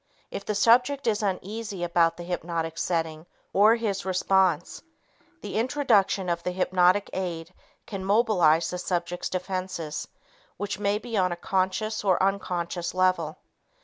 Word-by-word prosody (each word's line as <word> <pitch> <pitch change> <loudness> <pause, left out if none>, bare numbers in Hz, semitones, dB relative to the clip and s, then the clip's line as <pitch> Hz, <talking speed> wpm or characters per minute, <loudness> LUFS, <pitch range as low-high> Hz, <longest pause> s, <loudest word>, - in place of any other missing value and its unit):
If 200 - -6
the 210 - -2
subject 250 +7 +4
is 220 -2 +1
uneasy 200 0 -3
about 170 -1 +2
the 175 - -7
hypnotic 170 -2 -3
setting 160 -2 -2 0.3
or 215 +3 +6
his 205 -4 -2
response, 185 -2 +1 0.6
the - - -6
introduction 225 -7 +2
of 170 -1 -1
the 180 - -2
hypnotic 185 +1 +2
aid 175 -2 -4 0.3
can 195 -3 -6
mobilize 190 -6 +3
the 180 - -4
subject's 175 -1 -2
defenses 185 -4 -4 0.5
which 205 -1 -4
may 205 0 +1
be 230 0 -4
on 180 -2 +2
a - - -1
conscious 190 +5 -1
or 190 -2 +2
unconscious 180 -3 -2
level. 185 -4 +1
185 Hz, 140 wpm, -26 LUFS, 175-205 Hz, 0.6 s, or